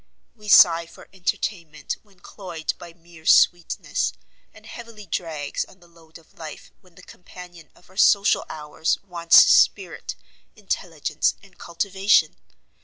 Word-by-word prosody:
We 215 -2 -16
sigh 170 -4 +6
for - - -16
entertainment, 175 -3 -4
when 195 -4 -28
cloyed 175 -6 -6
by 170 - -11
mere 165 -1 -16
sweetness; 175 -2 +2 0.4
and - - -18
heavily 230 -3 -11
drags 160 -4 -4
on 190 - -18
the 175 - -21
load 165 -1 -18
of 165 - -24
life 160 -2 -10
when 180 -3 -25
the 180 - -17
companion 175 -3 -14
of - - -23
our 190 - -21
social 200 -1 +4
hours 150 +1 -2
wants 170 -3 +5
spirit, - - +2 0.4
intelligence, 165 -7 -2
and 195 -3 -20
cultivation. 195 +4 +1
175 Hz, 135 wpm, -23 LUFS, 165-190 Hz, 0.4 s, sigh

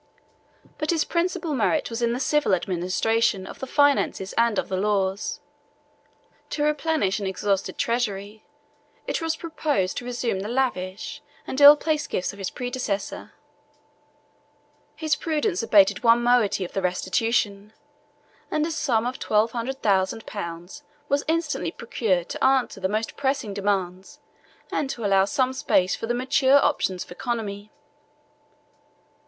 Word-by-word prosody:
But 305 -1 -2
his 325 -2 +2
principal 345 -2 -1
merit 265 +2 0
was 230 +1 -4
in 235 0 +2
the 245 - -2
civil 295 -7 +2
administration 190 +4 0
of - - -10
the 265 - -5
finances 285 -9 +2
and 230 -2 +2
of - - -1
the 190 - -2
laws. 195 0 -1 1.1
To 295 - -2
replenish 300 -9 +1
an 200 - -3
exhausted 195 +1 -1
treasury, 215 -3 -2 0.6
it - - -2
was 325 0 -1
proposed 295 - -1
to 245 - -4
resume 240 -5 -2
the 205 +3 -4
lavish 210 -7 -2 0.2
and 265 - -3
ill 290 +1 +11
placed 300 0 -1
gifts 185 - -2
of 200 - -13
his 195 - -3
predecessor: 245 -5 -4 1.6
his 315 -2 -1
prudence 300 - -1
abated 205 -1 +4
one 235 0 +5
moiety 240 -6 +2
of - - -9
the 195 - -1
restitution; 200 +3 0 0.8
and 305 0 0
a 335 - -3
sum 240 -7 0
of 250 +1 -3
twelve 215 +2 +2
hundred 255 +3 -4
thousand 195 +1 +1
pounds 175 +5 -7 0.3
was 280 +1 +1
instantly 315 - -1
procured 190 -3 -1
to - - -4
answer 265 -6 +2
the 190 0 -1
most 215 +2 -2
pressing 270 -6 -1
demands, 190 -2 -2 0.5
and 280 - -1
to 235 -5 -4
allow 195 -1 +4
some 260 +3 0
space 185 -7 +1
for 225 - -5
the 240 - 0
mature 265 +2 +4
operations 190 -11 +1
of - - -18
economy. 210 -2 -4
230 Hz, 145 wpm, -24 LUFS, 195-270 Hz, 1.6 s, ill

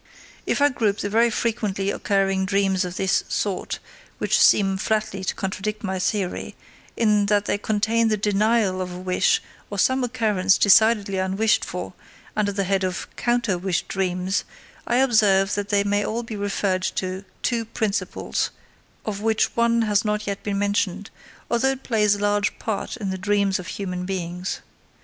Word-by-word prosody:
If 285 - +2
I 290 - +6
group 215 -6 0
the 205 - -3
very 230 +2 +4
frequently 210 -4 -1
occurring 195 -2 0
dreams 195 -1 +2
of 180 0 -5
this 190 -1 +1
sort, 200 -3 -2 0.4
which - - +1
seem 195 -2 +5
flatly 215 -1 -1
to 185 - -2
contradict 205 +2 -3
my 190 -2 -2
theory, 190 -1 -2 0.4
in 210 -3 +3
that 205 0 +2
they 205 - 0
contain 220 +2 +1
the 215 -1 +1
denial 210 -1 +1
of 180 -1 -4
a 180 - -7
wish 190 - +1 0.3
or - - -5
some 260 0 +2
occurrence 210 -5 +2
decidedly 205 -1 +4
unwished 195 +4 +2
for, - - -5 0.4
under 210 -1 +1
the 200 0 -1
head 195 0 0
of 185 0 -2
"counter 235 -6 0
wish 185 -1 -1
dreams," 185 0 -1 0.4
I 240 - +1
observe 210 -6 +4
that 205 0 -2
they 200 -1 +3
may 205 0 +1
all 230 +3 -2
be 225 -1 -6
referred 200 -2 -1
to 185 +1 -3 0.2
two 235 -2 0
principles, 220 -1 -2 0.6
of 205 -2 -3
which 220 0 +1
one 235 0 +3
has 210 -1 +2
not 210 -1 -1
yet 200 -1 -3
been 200 -1 -2
mentioned, 200 -1 -1 0.4
although 260 +3 +2
it 270 - -10
plays 210 -3 +2
a - - -7
large 205 0 +1
part 220 +2 -3
in 200 -5 -3
the 190 - -4
dreams 200 0 +1
of 180 - -8
human 180 0 -4
beings. 180 -1 -4
205 Hz, 170 wpm, -23 LUFS, 190-220 Hz, 0.6 s, I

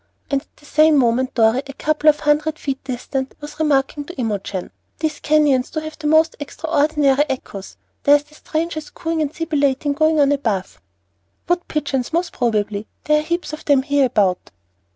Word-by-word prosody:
] - - -23
And 275 -1 +1
at - - -30
the 295 - -20
same 310 +1 +4
moment 255 0 +1
Dorry, 230 +2 +3
a 275 - -7
couple 305 +2 +2
of 300 - +2
hundred 300 +1 +1
feet 275 -3 -4
distant, 265 +1 -4
was 295 +1 -10
remarking 290 -1 +1
to 350 - -9
Imogen: 205 -6 -3 0.3
"These 310 -1 -2
canyons 295 -4 +2
do 315 - -3
have 310 0 -8
the 300 - -2
most 315 +1 +4
extraordinary 295 -2 +1
echoes. 205 -7 -6 0.2
There's 290 0 +5
the 300 +1 -24
strangest 315 0 -4
cooing 325 -1 -2
and 295 -2 -1
sibilating 290 -3 0
going 310 +1 +2
on 285 -1 +4
above." 205 - -2 0.7
"Wood 350 +1 0
pigeons, 280 -4 -2
most 345 +2 0
probably; 215 -3 -1 0.2
there 300 0 +3
are - - -1
heaps 340 +1 -3
of 305 - -7
them 280 -3 +4
hereabout." 255 -10 +1
290 Hz, 175 wpm, -20 LUFS, 260-310 Hz, 0.7 s, There's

